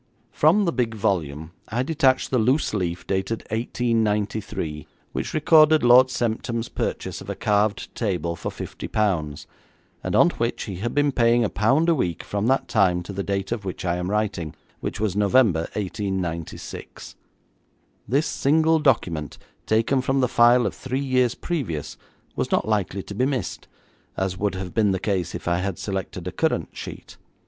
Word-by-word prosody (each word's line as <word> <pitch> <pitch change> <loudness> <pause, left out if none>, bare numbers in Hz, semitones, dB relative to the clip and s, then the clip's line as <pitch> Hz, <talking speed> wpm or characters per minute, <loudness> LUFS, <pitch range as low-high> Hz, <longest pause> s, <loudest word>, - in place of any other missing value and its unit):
From 180 +7 +4
the 170 - 0
big 120 -3 -1
volume 80 -6 -1 0.2
I 120 +3 -1
detached 135 -3 +2
the 130 - +3
loose 130 +6 +2
leaf, 90 -4 -2
dated 95 +4 -1
1893, 105 - -1 0.2
which - - -4
recorded 155 -1 +5
Lord 125 +2 +7
Semptam's 115 -1 -2
purchase - - -3
of - - -10
a - - -3
carved 105 0 0
table 90 -7 -2
for - - -4
fifty - - -7
pounds, 85 -9 -1 0.6
and - - -1
on - - +6
which - - -2
he 95 - -6
had 115 +5 -3
been 145 0 +3
paying 120 -1 +3
a 105 - -1
pound 135 +10 +2
a 170 - +5
week 90 - -1
from 105 +2 -2
that 135 +1 +2
time 90 -5 +2
to 100 - -7
the 100 - -2
date 100 0 -2
of 115 -3 -2
which 95 -1 -5
I 85 0 0
am 90 +1 -3
writing, 100 -7 -2 0.2
which - - -4
was 105 -3 0
November, 105 -5 +3
1896. 95 -5 -5 0.9
This 140 +8 +2
single 160 +3 +2
document 85 - 0 0.3
taken 115 +5 +2
from 135 +1 0
the 130 - +3
file 120 +1 +5
of - - -1
three 130 0 -3
years 130 -3 +1
previous, 120 - -3 0.4
was - - -1
not - - +1
likely 100 -3 -1
to - - -8
be 125 +6 +1
missed, 135 -3 -3 0.5
as 95 -1 -1
would 100 -2 0
have 95 -2 -5
been 105 -3 +3
the 95 - -1
case 95 -3 -1
if - - -7
I 85 0 +2
had 95 -1 -2
selected 95 -2 -4
a - - -2
current - - 0
sheet. - - -9
105 Hz, 175 wpm, -24 LUFS, 95-130 Hz, 0.9 s, Lord